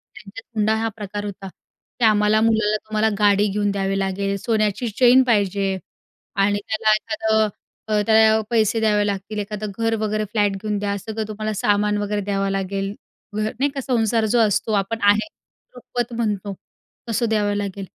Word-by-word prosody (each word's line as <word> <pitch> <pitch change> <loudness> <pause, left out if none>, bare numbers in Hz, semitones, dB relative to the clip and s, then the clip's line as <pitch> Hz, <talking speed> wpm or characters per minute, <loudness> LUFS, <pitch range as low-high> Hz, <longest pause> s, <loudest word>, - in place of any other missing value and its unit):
त्यांच्यात 210 +2 -11
हुंडा 215 +1 +2
हा 225 +1 -1
प्रकार 205 -1 -5
होता 195 -1 -7
की 225 +5 -6
आम्हाला 210 0 +4
मुलाला 220 -2 +2
तुम्हाला 215 0 +1
गाडी 205 0 +4
घेऊन 205 0 0
द्यावी 195 0 -1
लागेल, 195 +1 -1
सोन्याची 215 +2 0
चैन 255 +1 +7
पाहिजे 200 -3 +1 0.6
आणि 205 +1 +2
त्याला 220 0 +1
एखादं, 220 0 0 0.4
अ, 210 -1 +2
त्याला 220 0 +5
पैसे 225 -1 +2
द्यावे 210 -2 +2
लागतील. 200 +1 -3
एखादं 210 0 -4
घर 225 0 +1
वगैरे 215 0 -1
फ्लॅट 205 -2 +2
घेऊन 210 -1 -2
द्या, 200 0 -2
सगळं 220 +1 -5
तुम्हाला 215 0 -4
सामान 210 +1 +1
वगैरे 205 0 -2
द्यावं 195 0 -1
लागेल. 195 +1 -2 0.4
घर 215 0 -1
नाही 280 +2 +2
का, 275 -1 -4
संसार 230 -3 +1
जो 240 - +4
असतो 215 0 +2
आपण 225 +4 -5
आहेर, 205 +9 +3 0.5
रुखवत 245 -1 -4
म्हणतो, 205 -3 -2 0.6
तसं 235 +1 +1
द्यावं 205 -2 +1
लागेल 200 -1 -4
210 Hz, 165 wpm, -21 LUFS, 200-220 Hz, 0.6 s, चैन